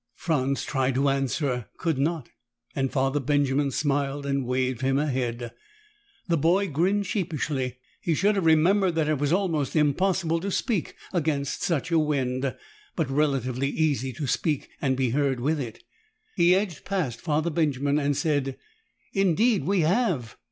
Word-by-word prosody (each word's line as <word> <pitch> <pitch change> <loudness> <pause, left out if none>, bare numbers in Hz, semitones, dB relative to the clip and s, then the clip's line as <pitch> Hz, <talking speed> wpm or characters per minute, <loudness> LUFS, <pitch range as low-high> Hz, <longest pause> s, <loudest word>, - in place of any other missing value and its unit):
Franz 140 -4 -1
tried 135 -2 0
to 140 +2 +3
answer, 135 -2 -1
could 165 -6 -1
not, 155 -2 -1 0.5
and 135 -1 0
Father 135 +1 +1
Benjamin 140 0 +1
smiled 140 0 -1
and 140 -2 -1
waved 130 0 -1
him 135 0 +2
ahead. 125 -5 -2 0.8
The 170 -2 +2
boy 180 +6 +2
grinned 190 +7 +1
sheepishly. 150 - -2 0.2
He 165 - 0
should 205 +6 +3
have 195 -3 0
remembered 175 +3 +4
that 160 -2 +1
it 150 -2 0
is 145 0 +1
almost 170 -7 0
impossible 165 +3 +2
to 195 +4 -3
speak 200 -2 -1 0.2
against 145 -5 -1
such 170 0 -1
a 165 - +4
wind 135 -3 -1 0.4
but 155 -6 -1
relatively 135 -2 0
easy 140 -5 0
to 145 - -4
speak, 150 +2 -1
and 130 -2 +1
be 130 -3 +1
heard, 135 -1 +1
with 150 +5 0
it. 120 -5 -6 0.5
He 175 +1 +5
edged 190 -5 -2
past 165 - -2
Father 155 +1 0
Benjamin 145 -2 +1
and 145 -1 0
said, 140 -3 0 0.6
"Indeed 195 +4 +2
we 195 -2 +2
have." 165 - +1
145 Hz, 155 wpm, -26 LUFS, 135-170 Hz, 0.8 s, He